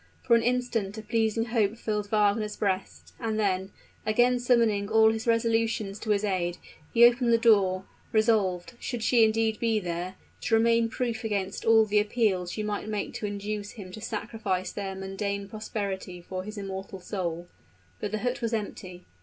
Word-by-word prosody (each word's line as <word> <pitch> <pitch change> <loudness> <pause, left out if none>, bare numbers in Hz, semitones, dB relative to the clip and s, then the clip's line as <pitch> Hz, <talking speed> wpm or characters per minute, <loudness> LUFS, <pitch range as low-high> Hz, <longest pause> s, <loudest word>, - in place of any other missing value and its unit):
For 240 -2 +5
an 230 - +4
instant 235 -4 -1
a 220 - -6
pleasing 225 0 +1
hope 220 -2 +1
filled 210 -3 -2
Wagner's 210 0 +2
breast; 195 -2 -2
and 220 -2 -1
then, 190 -2 0 0.3
again 245 +3 +3
summoning 230 -5 +2
all 220 0 +6
his 220 +1 -4
resolutions 225 -3 +1
to 220 - -6
his 205 -1 +2
aid, 180 -4 -1 0.3
he 235 0 +7
opened 240 0 +4
the 230 - +6
door, 195 -5 +3 0.3
resolved, 215 -4 +2
should 240 -3 -4
she 235 -2 +5
indeed 220 0 +2
be 225 -2 +2
there, 175 0 -4 0.3
to 225 - +2
remain 230 0 +3
proof 235 0 -2
against 200 -4 -2
all 225 -1 +6
the 210 0 +3
appeals 205 -4 +1
she 215 - -3
might 210 0 -3
make 210 -1 -3
to 210 - -3
induce 205 0 -4
him 195 -5 -9
to 215 - -9
sacrifice 210 -4 -3
to - - -20
their 195 -1 -3
mundane 200 +1 -3
prosperity 195 -4 -5 0.2
his 215 +2 -8
immortal 195 -1 -6
soul. 175 -3 -4 0.5
But - - -3
the 215 - -1
hut 245 +1 -1
was 230 -1 0
empty. 185 -4 -6
215 Hz, 175 wpm, -28 LUFS, 195-225 Hz, 0.5 s, he